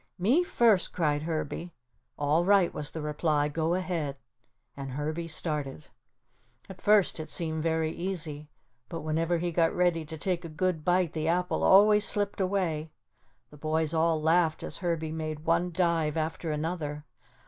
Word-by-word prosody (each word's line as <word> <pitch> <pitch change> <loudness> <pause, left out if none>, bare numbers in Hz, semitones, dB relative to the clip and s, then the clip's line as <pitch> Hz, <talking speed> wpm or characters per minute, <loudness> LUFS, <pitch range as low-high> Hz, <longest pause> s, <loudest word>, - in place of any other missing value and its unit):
"Me 245 - +3
first," 230 - +3
cried 150 -4 +1
Herbie. 160 +1 -4 0.4
"All 150 +3 +2
right," 195 -1 +4
was 145 - -2
the 160 - -6
reply, 150 -1 +1
"go 160 +3 0
ahead." 170 -7 -2 0.6
And 135 -2 -6
Herbie 155 +4 -3
started. 150 - -3 0.8
At 190 -1 -11
first 205 -5 +4
it 155 - -6
seemed 160 -2 -2
very 160 0 0
easy, 160 -5 -5 0.4
but 165 - -5
whenever 165 +3 0
he 175 +1 -2
got 165 0 +2
ready 175 -2 +2
to 160 +1 -7
take 180 +2 -2
a 165 - -7
good 160 0 -1
bite 180 0 +2
the 155 -1 -2
apple 180 +2 0
always 210 +2 +6
slipped 205 -2 -1
away. 180 -5 -1 0.6
The 150 - -13
boys 155 +1 0
all 165 0 +2
laughed 160 +1 +2
as - - -4
Herbie 165 -3 -2
made 155 -1 -4
one 170 +2 +2
dive 165 -3 +1
after 160 +1 -2
another. 150 -1 -3
165 Hz, 160 wpm, -28 LUFS, 155-180 Hz, 0.8 s, always